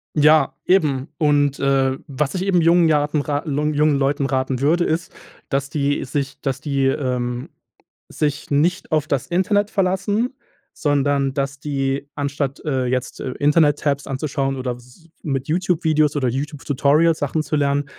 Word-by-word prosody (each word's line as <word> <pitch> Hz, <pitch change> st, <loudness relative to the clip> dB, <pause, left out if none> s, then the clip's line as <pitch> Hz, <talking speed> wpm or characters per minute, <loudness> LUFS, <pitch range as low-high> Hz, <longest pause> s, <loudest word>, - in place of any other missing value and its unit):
Ja 155 Hz, +1 st, +4 dB
eben 150 Hz, -8 st, +2 dB
und, 145 Hz, -2 st, +2 dB
äh, 135 Hz, -1 st, +2 dB
was 140 Hz, 0 st, -2 dB
ich 185 Hz, -, -1 dB
eben 185 Hz, -3 st, +2 dB
jungen 170 Hz, 0 st, +5 dB
jaten 150 Hz, 0 st, +1 dB
raten 145 Hz, +2 st, -3 dB
lung 150 Hz, +2 st, 0 dB
jungen 150 Hz, -1 st, +3 dB
Leuten 140 Hz, +1 st, 0 dB
raten 130 Hz, -1 st, -1 dB
würde 170 Hz, +5 st, +3 dB
ist, 160 Hz, +1 st, -2 dB, 0.4 s
dass 140 Hz, 0 st, -1 dB
die 145 Hz, -1 st, 0 dB
sich 140 Hz, +1 st, -3 dB
dass 135 Hz, -1 st, -2 dB
die, 140 Hz, -2 st, 0 dB
ähm, 125 Hz, -2 st, -2 dB, 0.6 s
sich 145 Hz, -1 st, -2 dB
nicht 170 Hz, +5 st, +1 dB
auf 155 Hz, -1 st, +1 dB
das 140 Hz, -4 st, -1 dB
Internet 205 Hz, +4 st, +1 dB
verlassen, 205 Hz, +6 st, 0 dB, 0.4 s
sondern, 140 Hz, -2 st, +1 dB
dass 140 Hz, 0 st, -3 dB
die 140 Hz, -1 st, -2 dB
anstatt, 140 Hz, -1 st, -3 dB
äh, 130 Hz, -4 st, 0 dB
jetzt, 125 Hz, 0 st, -2 dB
äh, 130 Hz, -, -4 dB
Internet-Tabs 145 Hz, -1 st, +2 dB
anzuschauen 135 Hz, 0 st, -2 dB
oder 125 Hz, -2 st, -3 dB
s 125 Hz, +7 st, -19 dB
mit 135 Hz, -2 st, -2 dB
YouTube 175 Hz, +1 st, 0 dB
Videos 155 Hz, -2 st, +2 dB
oder 130 Hz, -3 st, 0 dB
YouTube-Tutorials 145 Hz, +4 st, +1 dB
Sachen 145 Hz, +2 st, -1 dB
zu 150 Hz, -, -2 dB
lernen, 140 Hz, 0 st, +1 dB
145 Hz, 155 wpm, -21 LUFS, 135-155 Hz, 0.6 s, jungen